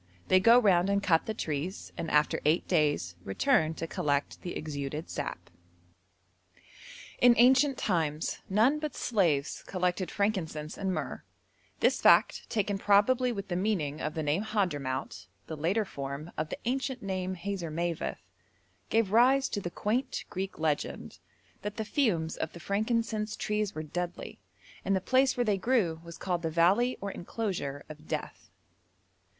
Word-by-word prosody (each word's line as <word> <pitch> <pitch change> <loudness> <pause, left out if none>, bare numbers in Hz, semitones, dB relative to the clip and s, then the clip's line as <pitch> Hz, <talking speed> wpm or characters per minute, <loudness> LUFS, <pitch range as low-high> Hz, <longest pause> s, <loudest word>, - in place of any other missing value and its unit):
They 185 - +6
go 230 +5 +7
round 195 -6 +4
and 200 0 +1
cut 165 -4 +2
the 220 - -1
trees, 160 +2 -4
and 165 - -4
after 150 0 +2
eight 155 +4 +2
days 145 - +1
return 160 - +2
to 165 - -4
collect 150 -5 -1
the 175 - -5
exuded 150 +1 -5
sap. - - -5 1.7
In 245 -1 +7
ancient 260 +3 +5
times 160 -6 -1
none 230 +10 +3
but 300 -3 -4
slaves 165 - 0
collected 180 -1 -1
frankincense 165 -7 -2
and 190 -1 -2
myrrh. - - -4 0.6
This - - +3
fact, - - +4
taken 205 -3 -1
probably 235 +6 +3
with 200 -3 -5
the 175 - -1
meaning 175 -7 -1
of 150 - -3
the 160 - -2
name 150 +5 +1
Hadhramout 145 - -2 0.2
(the 160 - -6
later 180 +8 0
form 140 0 -6
of 155 0 -3
the - - -4
ancient 260 0 -2
name 185 -1 -2
Hazarmaveth), 170 -3 -3 0.6
gave 225 -3 +2
rise 260 +5 +5
to 205 - -3
the 175 - -4
quaint 235 +9 -2
Greek 195 0 -4
legend 155 -2 -2 0.4
'that 210 +1 -5
the 220 - -2
fumes 200 - 0
of 160 - -3
the 170 - -9
frankincense 215 +2 -1
trees 210 -1 -2
were 155 - -4
deadly, 175 +3 -5 0.4
and 195 - +1
the - - +2
place 260 +7 +2
where 245 - +2
they 205 -3 +1
grew 185 -8 +1
was 170 0 -10
called 180 -2 -2
the 165 - -1
valley 190 +10 +3
or 200 0 -3
enclosure 175 -9 -4
of 155 0 -12
death.' - - -5
185 Hz, 155 wpm, -29 LUFS, 160-215 Hz, 1.7 s, go